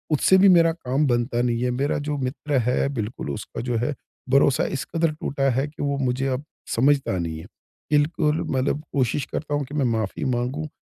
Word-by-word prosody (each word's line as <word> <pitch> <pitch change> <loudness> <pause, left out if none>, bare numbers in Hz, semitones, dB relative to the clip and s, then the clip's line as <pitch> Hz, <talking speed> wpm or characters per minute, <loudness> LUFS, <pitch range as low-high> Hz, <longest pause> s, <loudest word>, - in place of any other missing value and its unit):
उससे 190 +6 +5
भी 195 - +8
मेरा 165 -1 +5
काम 145 -2 -1
बनता 120 -1 +1
नहीं 120 -1 0
है। 125 - +1
मेरा 145 - +1
जो 150 -1 -1
मित्र 145 +2 -2
है 125 - +1
बिल्कुल 105 - -4
उसका - - -6
जो 120 - 0
है, 150 - 0 0.4
भरोसा 140 -1 +4
इस - - -4
कदर 165 -1 +2
टूटा 140 -2 -1
है 135 +3 +1
कि 150 - -10
वो 140 0 0
मुझे 130 +2 0
अब 140 - -9 0.3
समझता 135 -5 +2
नहीं 80 -2 -3
है। - - -10 0.5
बिल्कुल 150 +1 +2
मतलब 135 +3 0
कोशिश 135 0 0
करता 145 -1 -3
हूँ 145 - 0
कि 140 - -12
मैं 140 -3 +1
माफ़ी 110 +4 -3
माँगूँ। 130 +6 -2
140 Hz, 200 wpm, -24 LUFS, 125-150 Hz, 0.5 s, भी